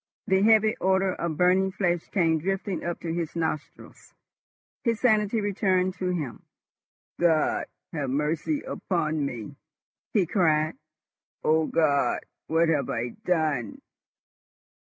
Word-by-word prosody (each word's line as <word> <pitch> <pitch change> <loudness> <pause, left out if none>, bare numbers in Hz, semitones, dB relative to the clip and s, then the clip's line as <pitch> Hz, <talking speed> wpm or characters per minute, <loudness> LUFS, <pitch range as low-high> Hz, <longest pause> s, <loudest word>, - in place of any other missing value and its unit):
The 190 0 +3
heavy 220 +1 +5
odour 190 0 +2
of 170 -4 -3
burning 185 +2 +3
flesh 175 -4 -1
came 165 -5 +2
drifting 195 +2 -2
up 175 0 -3
to 165 -1 -3
his 170 -2 -3
nostrils. 160 -3 -5 0.7
His 230 -2 0
sanity 215 -2 +2
returned 190 -2 +1
to 185 - -1
him. 150 -10 -3 0.8
"God 165 -3 +2 0.3
have 145 -5 -2
mercy 150 - -1
upon 155 -4 -2
me!" 130 0 -5 0.5
he 200 -5 +3
cried. 155 -4 +2 0.7
"O 160 0 +3
God! 145 -4 +2 0.3
what 165 +1 +3
have 145 -5 +1
I 115 +1 -2 0.2
done?" 155 -9 0
170 Hz, 120 wpm, -26 LUFS, 155-190 Hz, 0.8 s, heavy